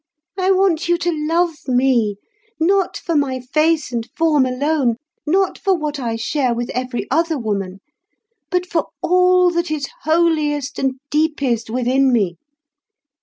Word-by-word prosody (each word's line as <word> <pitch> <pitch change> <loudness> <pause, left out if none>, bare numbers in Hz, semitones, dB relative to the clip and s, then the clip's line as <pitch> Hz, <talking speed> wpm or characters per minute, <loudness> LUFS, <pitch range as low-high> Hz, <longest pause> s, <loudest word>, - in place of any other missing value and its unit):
I 375 -1 0
want 375 -3 +2
you 345 - +3
to 345 0 -1 0.2
love 330 -2 0
me, 245 -5 +2 0.4
not 375 +3 +2
for 335 - -3
my 270 -3 +1
face 305 +4 +1
and 235 -1 -3
form 300 -5 +3
alone, 265 -1 0 0.3
not 380 +5 +1
for 385 -2 +1
what 300 -2 -3
I 235 -3 -2
share 245 +2 0
with 240 0 -3
every 250 -1 -3
other 325 +2 +1
woman, 200 -5 -3 0.7
but 360 0 0
for 335 -4 -1 0.2
all 360 0 +4
that 345 0 -1
is 300 -3 -2
holiest 305 -3 +1
and 265 -1 0 0.2
deepest 280 -7 0
within 255 +3 +2
me. 190 -8 0
295 Hz, 145 wpm, -19 LUFS, 250-340 Hz, 0.7 s, all